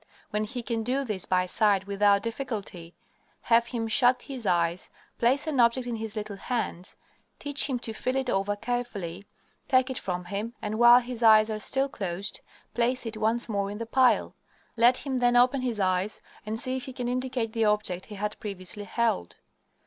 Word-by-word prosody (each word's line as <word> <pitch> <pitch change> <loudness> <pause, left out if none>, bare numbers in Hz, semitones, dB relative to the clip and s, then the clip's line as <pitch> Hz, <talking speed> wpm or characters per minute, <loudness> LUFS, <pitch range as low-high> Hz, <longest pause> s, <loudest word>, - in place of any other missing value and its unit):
When 210 0 -1
he 245 +2 -5
can 225 0 -2
do 255 +5 0
this 205 -6 0
by 180 -1 +2
sight 195 +1 +1
without 200 0 +2
difficulty, 210 -8 -5 0.5
have 235 0 +3
him 235 -2 -3
shut 245 +3 +3
his 255 -6 -5
eyes, 170 0 0 0.3
place 260 +6 +2
an 305 -5 -1
object 240 +1 +3
in 240 -2 -3
his 220 -1 -5
little 210 -2 -5
hands, 200 -5 -4 0.4
teach 285 0 +3
him 260 - 0
to 230 -2 -4
feel 255 +4 -2
it 265 -1 -1
over 200 -2 0
carefully, 205 -5 -4 0.4
take 260 0 +3
it 260 - -3
from 180 -1 -4
him, 205 +5 -4
and, 215 +1 -4
while 240 +1 +8
his 245 -1 -7
eyes 220 -1 +6
are 215 - -3
still 270 +5 0
closed, 195 -5 -4 0.3
place 245 +1 0
it 225 -1 -5
once 225 +2 0
more 200 -3 -1
in 205 - -6
the 230 - -4
pile. 255 +2 +3 0.4
Let 240 +2 +5
him 265 -2 -3
then 245 0 +3
open 250 +2 +4
his 240 -4 -2
eyes 185 +2 0 0.3
and 220 +1 -3
see 255 +2 -1
if 260 - -5
he 260 - -8
can 250 -1 -4
indicate 250 -2 -2
the 225 -1 +1
object 210 -4 0
he 210 - -9
had 210 +1 -4
previously 200 0 -6
held. 90 - -1
225 Hz, 195 wpm, -27 LUFS, 200-245 Hz, 0.5 s, while